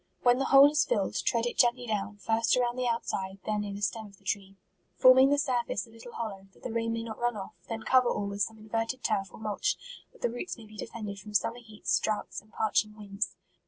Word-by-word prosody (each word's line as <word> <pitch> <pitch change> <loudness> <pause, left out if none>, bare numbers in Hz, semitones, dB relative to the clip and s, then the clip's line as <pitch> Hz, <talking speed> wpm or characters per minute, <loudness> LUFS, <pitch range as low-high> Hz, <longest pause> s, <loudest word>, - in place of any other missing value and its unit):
When 245 0 +5
the 270 - +1
hole 275 +2 +8
is 300 - +3
filled, - - 0
tread 235 -1 +1
it 240 - -3
gently 245 0 +4
down, 210 -2 -2
first 225 +3 +2
around 240 -1 +1
the 255 -1 -1
outside, 195 -5 -2
then 210 -1 0
near 200 -1 -4
the 205 - -6
stem 210 +3 -1
of 200 -1 -17
the - - -27
tree, 195 -1 -3 0.4
forming 255 +6 +7
the 285 - +3
surface 250 -7 0
a 225 - -19
little 230 +1 -12
hollow, 195 -4 -5
that - - -22
the 250 - -4
rain 230 0 0
may 230 0 -2
not 220 -2 -7
run 240 -2 0
off; 195 - -7 0.2
then 225 -1 -4
cover 255 -2 +4
all 205 - -1
with 200 0 -4
some 220 +2 0
inverted 225 +4 -3
turf 195 -4 0
or - - -12
mulch, 215 - -1 0.3
that - - -18
the 240 - +2
roots 245 +7 -5
may 230 - -12
be 215 0 -14
defended 210 -2 -6
from 210 +2 -10
summer 230 +4 +1
heats, 210 -6 -1
droughts, 215 -1 -2
and 215 +2 -25
parching 215 0 0
winds. 205 0 -3
225 Hz, 240 wpm, -29 LUFS, 205-240 Hz, 0.4 s, hole